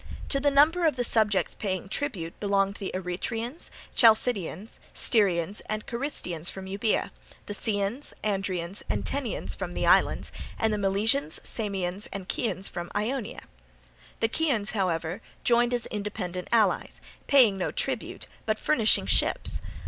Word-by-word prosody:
To 275 - +3
the 285 +1 +3
number 315 +5 +5
of 305 - +1
the 245 - 0
subjects 215 -4 +2
paying 190 -3 -3
tribute 195 - -3
belonged 200 -1 +1
the 195 - -4
Eretrians, 225 - -3 0.3
Chalcidians, 220 -4 +3 0.2
Styrians, 195 -3 +1
and 215 0 -3
Carystians 235 - -2
from 190 0 -7
Euboea; 200 +4 0 0.3
the 205 - -5
Ceans, 205 +5 -1
Andrians, 190 -3 -1
and - - -1
Tenians 275 -4 -2
from - - -5
the - - 0
islands; - - +3 0.3
and 220 -1 +1
the 210 - -1
Milesians, 200 - +1
Samians, 195 -3 -3
and 190 -2 -6
Chians 195 -4 -1
from 175 -1 -5
Ionia. 235 +2 -2 0.8
The 225 - +4
Chians, 235 -7 0
however, 180 -1 -1 0.2
joined 240 0 +4
as 245 -2 0
independent 200 -4 -4
allies, 230 -2 +2 0.3
paying 255 -8 +6
no - - 0
tribute, - - -3 0.2
but 215 0 +1
furnishing 225 -6 +3
ships. - - +2
210 Hz, 140 wpm, -27 LUFS, 190-240 Hz, 0.8 s, paying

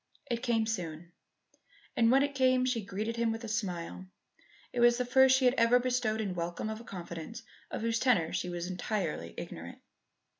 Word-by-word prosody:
It 235 -1 -1
came 230 -3 +1
soon, 175 -6 -4 0.8
and 230 -1 +4
when 270 +3 +5
it 285 0 -1
came 255 -1 +3
she 245 -4 0
greeted 215 +4 -3
him 230 -1 +1
with 225 +1 -5
a - - -5
smile. 185 -4 -3 0.7
It 245 - -2
was 240 0 +6
the 250 - 0
first 265 +1 +6
she 265 - +1
had 250 - +5
ever 230 +2 +6
bestowed 245 -3 0
in 200 -4 -2
welcome 175 +5 -3
of 220 +1 -6
a - - -11
confidence 175 +2 -7 0.3
of - - -4
whose 230 0 0
tenor 200 -11 +2
she 180 - -2
was 175 -1 -4
entirely 180 - -3
ignorant. - - -7
225 Hz, 190 wpm, -31 LUFS, 180-245 Hz, 0.8 s, was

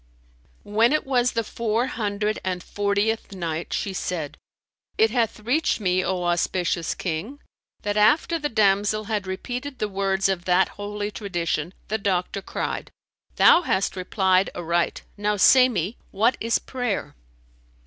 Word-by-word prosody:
When 225 +5 +3
it 305 - +1
was 250 -2 +2
the 230 - 0
Four 230 +2 -1
Hundred 210 -3 -2
and 185 -1 -3
Fortieth 205 +1 -1
Night, 170 -3 -4
She 195 - -2
said, 170 -5 -3 0.6
It 220 0 +4
hath 230 -3 0
reached 255 +8 +1
me, 185 -2 +1
O 185 -1 -1
auspicious 175 -1 0
King, 190 - -4 0.4
that 205 0 -1
after 305 +9 +3
the 295 -1 -2
damsel 210 -1 +2
had 210 -2 -3
repeated 250 +8 -5
the 215 - -1
words 195 -1 0
of 185 -3 -2
that 180 +1 +3
Holy 205 0 -5
Tradition 175 -6 -2 0.2
the 220 +1 -1
doctor 195 0 -1
cried, - - -4 0.5
"Thou - - +7
hast 200 - 0
replied 185 0 +2
aright: 170 0 -1
now 210 0 0
say 255 +6 +7
me, 200 -1 -2
what 225 +6 +2
is 230 +1 +1
prayer?" 245 -5 -3
205 Hz, 145 wpm, -24 LUFS, 185-225 Hz, 0.6 s, Thou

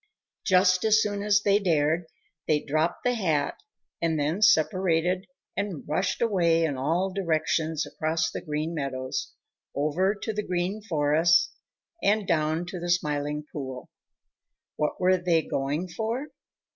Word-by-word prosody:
Just 185 -1 +4
as 220 0 +5
soon 205 -2 -1
as 205 0 +3
they 200 0 +4
dared, 165 -3 +1 0.4
they 150 -1 +3
dropped 155 +4 -1
the 245 - +2
hat 160 -10 0 0.4
and 165 -2 +1
then 155 +7 -1
separated 185 -1 +3 0.3
and 200 -6 -4
rushed 185 +9 0
away 170 -7 +3
in 150 -4 0
all 170 +8 0
directions 160 -3 0
across 160 +1 -1
the - - -5
Green 155 +2 -3
Meadows, 130 -3 -3 0.4
over 165 +8 +1
to 220 +2 -4
the 210 - -1
Green 185 +2 -2
Forest, 165 +1 +3 0.5
and 205 0 +2
down 160 +1 +1
to 175 +1 -6
the 175 +1 -4
Smiling 150 -3 -1
Pool. 130 -3 -6 0.8
What 150 - -1
were 185 0 +4
they 170 -2 +2
going 145 +7 -2
for? 230 - -3
170 Hz, 140 wpm, -27 LUFS, 150-195 Hz, 0.8 s, as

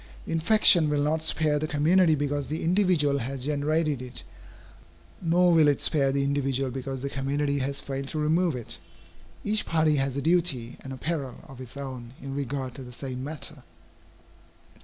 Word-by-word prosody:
The - - -6
infection 165 -1 +5
will 145 -1 +1
not 155 +2 0
spare 155 -2 +1
the 155 - -2
community 160 +3 +3
because 145 -1 -2
the 155 - -3
individual 165 -6 +2
has 130 +1 -4
generated 150 -1 0
it, 125 -1 -7 1.0
nor 175 +1 +3
will 160 -2 +5
it 145 -2 +3
spare 140 -4 +2
the 140 0 0
individual 135 -2 0
because 135 0 -5
the 140 - -2
community 140 +1 -1
has 140 +1 +1
failed 135 0 -5
to 155 - -4
remove 160 +1 +1
it. 120 -3 -4 0.6
Each 215 +1 +1
party 160 -2 +2
has 135 -1 0
a - - -1
duty 160 -9 +1
and 135 - -8
a 130 - -6
peril 140 -4 -4
of 135 -3 -11
its 130 +2 -9
own 130 -3 -7
in 135 0 -7
regard 135 -2 -3
to 135 - -8
the 125 - -10
same 130 0 -6
matter. 150 0 -6
145 Hz, 180 wpm, -27 LUFS, 135-160 Hz, 1.0 s, infection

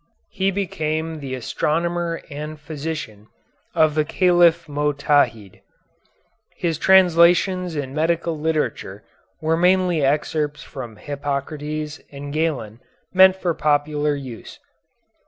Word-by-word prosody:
He 190 +1 0
became 160 -4 -2
the 135 -2 -5
astronomer 170 +6 -2
and 150 +1 -6
physician 150 -8 -6 0.5
of 155 -2 +4
the 155 0 +2
Caliph 170 0 +3
Motadhid. 145 -8 0 0.9
His 165 -2 -2
translations 180 -1 +4
in 135 -3 -4
medical 165 +2 0
literature 155 0 -2 0.4
were 160 +1 +1
mainly 180 -1 +3
excerpts 150 +1 0
from 120 -5 -8
Hippocrates 145 +4 -4
and 140 0 -7
Galen 135 -9 -2 0.3
meant 190 0 +7
for 180 -3 -1
popular 150 -1 +1
use. 130 -5 -9
155 Hz, 100 wpm, -22 LUFS, 145-170 Hz, 0.9 s, meant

